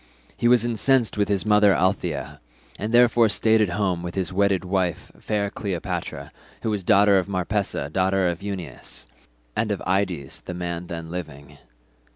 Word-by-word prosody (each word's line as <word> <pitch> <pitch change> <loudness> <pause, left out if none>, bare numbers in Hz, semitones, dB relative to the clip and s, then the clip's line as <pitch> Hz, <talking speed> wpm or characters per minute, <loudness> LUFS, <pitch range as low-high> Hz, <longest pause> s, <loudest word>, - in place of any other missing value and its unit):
He 120 - +1
was 120 -1 +5
incensed 120 +1 +2
with 105 -1 +1
his 100 -1 0
mother 105 -2 +5
Althaea, 90 -7 -1 0.4
and 105 +2 -3
therefore 120 -1 +5
stayed 110 +1 +3
at 105 - +2
home 90 -2 -1
with 85 0 -6
his 95 -2 -2
wedded 95 -2 +2
wife 90 -2 -1
fair 100 -2 -1
Cleopatra, 95 -5 -4 0.3
who 110 - 0
was 105 -2 -1
daughter 100 0 +5
of 95 - -3
Marpessa 95 -4 -1
daughter 95 +4 +1
of 85 +1 -2
Euenus, 95 -9 -6 0.5
and 110 0 0
of 105 - -1
Ides 95 -7 -1
the 90 - -7
man 85 0 -4
then 85 -1 -6
living. 75 -6 -8
95 Hz, 165 wpm, -24 LUFS, 90-105 Hz, 0.5 s, was